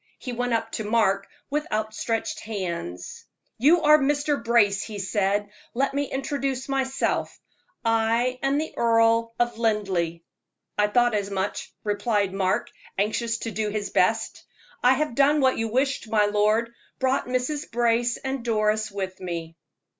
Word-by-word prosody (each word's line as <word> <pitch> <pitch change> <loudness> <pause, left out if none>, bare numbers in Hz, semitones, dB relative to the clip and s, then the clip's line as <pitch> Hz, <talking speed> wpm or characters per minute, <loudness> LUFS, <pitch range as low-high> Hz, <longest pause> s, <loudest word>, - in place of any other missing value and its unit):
He 255 - -6
went 245 0 -1
up 225 0 -1
to 220 - -3
Mark 205 -3 +1 0.2
with 300 +1 -2
outstretched 220 +1 -2
hands. 170 - -5 0.3
"You 325 +8 +5
are 300 +1 +7
Mr. 290 -1 0
Brace," 210 -4 +3
he 215 -2 -6
said. 200 +1 0 0.2
"Let 275 +2 +1
me 285 +1 0
introduce 270 -1 -3
myself 270 -1 -1 0.5
I 230 +3 +2
am 275 +1 +1
the 315 +1 -3
Earl 230 0 +3
of 240 -1 0
Linleigh." 190 -7 0 0.5
"I 210 0 +3
thought 240 +2 +3
as 205 -1 -1
much," 195 0 -3
replied 205 -2 0
Mark, 190 -1 0 0.3
anxious 225 +3 0
to 230 - -3
do 215 0 -1
his 205 -1 -3
best. - - +1 0.4
"I 250 +1 +5
have 300 -2 -1
done 280 +4 +4
what 260 -3 +3
you 225 - 0
wished, 255 0 0
my 215 -1 +3
lord 215 +3 +1 0.2
brought 260 0 0
Mrs. 255 +4 -2
Brace 235 0 +1
and 265 -2 -4
Doris 215 -2 +1
with 190 -2 -5
me." 170 -3 -5
230 Hz, 150 wpm, -25 LUFS, 205-260 Hz, 0.5 s, are